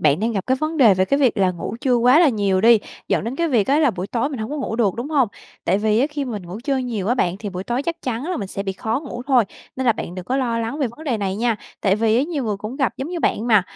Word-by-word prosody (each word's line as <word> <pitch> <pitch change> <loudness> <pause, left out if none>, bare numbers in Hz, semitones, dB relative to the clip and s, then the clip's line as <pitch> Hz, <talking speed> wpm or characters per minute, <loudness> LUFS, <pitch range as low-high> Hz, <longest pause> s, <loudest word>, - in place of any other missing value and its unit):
bạn 150 +4 +3
đang 230 +1 0
gặp 195 -3 -3
cái 260 0 +2
vấn 310 +3 -2
đề 225 -9 +6
về 185 0 +2
cái 275 +7 +1
việc 255 -5 +3
là 190 -1 +3
ngủ 180 +5 -5
trưa 255 -2 +2
quá 250 +5 +5
là 325 - +6
nhiều 200 -5 +1
đi, 230 0 +6 0.3
dẫn - - +1
đến 240 +4 -4
cái 335 +1 +1
việc 225 -8 +2
á 285 +3 +3
là 290 -5 +4
buổi 185 -1 -5
tối 235 +5 -1
mình 270 -5 -6
hông 220 +3 -4
có 300 - -3
ngủ 240 -5 -3
được, 210 -6 +2
đúng 245 +5 -5
hông? 270 -7 +3 0.4
Tại 190 +3 +2
vì 215 +1 +2
á 275 - +3
khi 290 -2 -3
mình 215 -6 -5
ngủ 185 +5 -7
trưa 275 -2 +1
nhiều 230 -6 -2
á 245 - +3
bạn, 180 -7 0
thì 210 - -5
buổi 185 0 -5
tối 240 +4 -1
chắc 335 +2 -4
chắn 250 +1 -3
là - - -1
mình 195 -4 -4
sẽ 195 - -4
bị 195 -1 -3
khó 225 +6 -2
ngủ 245 -5 -7
thôi, 255 -5 +4 0.3
nên 260 - -2
là 235 - +6
bạn 175 - -6
đừng 185 -1 -6
có 260 - -1
lo 235 -4 0
lắng 230 +6 -3
về 275 - +1
vấn 315 - -11
đề 250 -6 0
này 195 -1 -2
nha, 230 0 +1 0.2
tại 195 -1 +2
vì 220 +1 +2
á 255 - +3
nhiều 295 -5 -2
người 210 -2 -1
cũng 215 +6 -6
gặp 270 -4 +1
giống 270 +4 -4
như 350 -2 -4
bạn 225 - 0
mà. 215 -5 +5
235 Hz, 330 wpm, -21 LUFS, 205-270 Hz, 0.4 s, đề